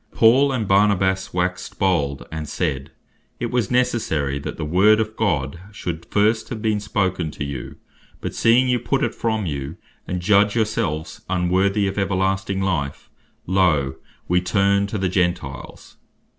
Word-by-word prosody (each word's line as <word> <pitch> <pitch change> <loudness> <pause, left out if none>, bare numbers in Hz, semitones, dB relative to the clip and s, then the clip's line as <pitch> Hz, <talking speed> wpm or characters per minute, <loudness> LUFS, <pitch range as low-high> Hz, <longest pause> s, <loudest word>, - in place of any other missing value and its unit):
"Then - - -20
Paul 130 +5 +5
and 115 -6 -1
Barnabas 95 -1 +2
waxed 90 0 -2
bold, 75 -8 0
and 80 -1 -5
said, 65 0 -2 0.5
It 120 - -3
was 120 -5 0
necessary 110 - 0
that - - -6
the - - -3
Word 100 +7 +4
of 110 0 -2
God 85 -8 -1
should 85 -5 -5
first 110 +2 +1
have 115 - -5
been 105 -1 0
spoken 95 -5 -1
to 75 - -6
you, 70 -3 -6 0.4
but - - -5
seeing 120 +3 +4
you 125 -1 +2
put 135 +2 0
it 120 - 0
from 110 -3 -1
you, 70 -2 -4 0.3
and 90 - -2
judge 100 +3 +3
your 110 -2 +3
selves 90 -8 -3
unworthy 95 +2 +1
of 95 +1 -2
everlasting 95 0 0
life, 75 -8 -2 0.3
loe, 75 -8 +2 0.3
we 90 +1 +2
turn 100 +2 +2
to 110 - -4
the 95 -1 0
Gentiles." 90 -6 -3
95 Hz, 160 wpm, -22 LUFS, 85-110 Hz, 0.5 s, Paul